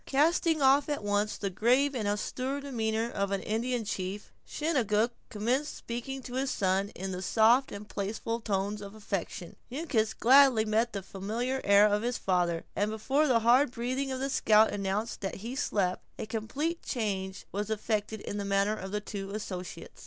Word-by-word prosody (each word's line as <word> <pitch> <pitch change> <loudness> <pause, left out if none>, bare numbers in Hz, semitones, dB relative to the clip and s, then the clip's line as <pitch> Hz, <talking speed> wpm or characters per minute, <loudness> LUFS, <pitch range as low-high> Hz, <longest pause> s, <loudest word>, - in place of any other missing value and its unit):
Casting 315 +2 +2
off 275 +2 +5
at 290 -7 -2
once 205 +1 0
the 200 -2 -3
grave 255 +8 +3
and 225 -5 -2
austere 255 +6 -2
demeanor 230 -4 -1
of 200 0 -1
an 195 -1 -2
Indian 235 +2 -1
chief, 195 +1 -4 0.2
Chingachgook 240 -8 +1 0.2
commenced 245 +8 -1
speaking 255 +3 -5
to 245 - -8
his 265 +1 0
son 195 -1 +1
in 190 +1 -4
the 180 0 -4
soft 230 +7 +4
and 205 +1 -7
playful 220 +3 -3
tones 205 0 -1
of 200 +1 -9
affection. 195 -4 -5
Uncas 245 -6 -1
gladly 260 -2 +6
met 220 +2 +1
the 200 -2 -4
familiar 230 +8 -3
air 200 +1 +6
of 210 0 +2
his 245 +1 -1
father; 175 -3 0
and 205 +1 +1
before 265 +8 +1
the 240 -4 +3
hard 245 +5 +5
breathing 255 +3 -2
of 260 - -3
the 270 +1 -2
scout 215 -2 +5
announced 205 +3 -2
that 195 - -3
he 230 +6 -6
slept, 195 -9 0
a - - -4
complete 265 +10 -3
change 195 -5 -3
was 205 +2 -3
effected 215 0 -2
in 205 - -5
the - - -2
manner 200 +1 +1
of 190 -2 -7
his 210 0 -2
two 195 -1 -5
associates. 190 -4 -6
220 Hz, 180 wpm, -30 LUFS, 200-255 Hz, 0.2 s, gladly